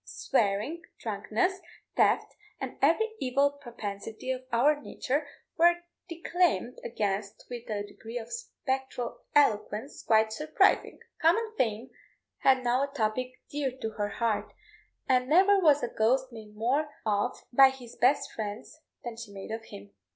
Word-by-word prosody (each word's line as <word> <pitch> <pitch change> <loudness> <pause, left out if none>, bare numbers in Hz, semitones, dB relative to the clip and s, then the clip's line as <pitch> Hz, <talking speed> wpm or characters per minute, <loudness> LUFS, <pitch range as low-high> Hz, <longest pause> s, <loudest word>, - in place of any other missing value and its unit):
Swearing, 220 +8 0 0.2
drunkenness, 220 - -1 0.4
theft, - - +2 0.2
and 265 -2 -5
every 335 +11 +3
evil 275 +2 +2
propensity 225 -3 -6
of 255 -1 -3
our 290 +6 +3
nature, 285 +2 -2 0.3
were 345 +1 +6 0.3
declaimed 335 - 0
against 205 -3 -3
with 240 -1 -7
a 205 -1 -2
degree 225 +3 -8
of 230 -1 -7
spectral 265 - -4
eloquence 215 -2 +2
quite 220 -1 +3
surprising. 310 - +2 0.2
Common 440 +8 +3
fame 230 - -1 0.5
had 260 -1 +4
now 245 +2 +2
a 280 - -3
topic 255 0 -1 0.2
dear 285 -2 0
to 220 - -3
her 205 -1 -2
heart, 210 -3 -1 0.6
and 255 0 +2
never 390 +5 +6
was 300 -6 +4
a - - +1
ghost 255 +4 +1
made 215 -2 -11
more 265 +8 +1 0.2
of 205 -1 +1 0.2
by 270 +1 +8
his 255 -3 -10
best 265 +4 +2
friends 215 +8 -6 0.2
than 240 -2 -5
she 230 -3 -8
made 195 +1 -8
of 225 0 -5
him. 100 0 -11
250 Hz, 145 wpm, -29 LUFS, 220-285 Hz, 0.6 s, by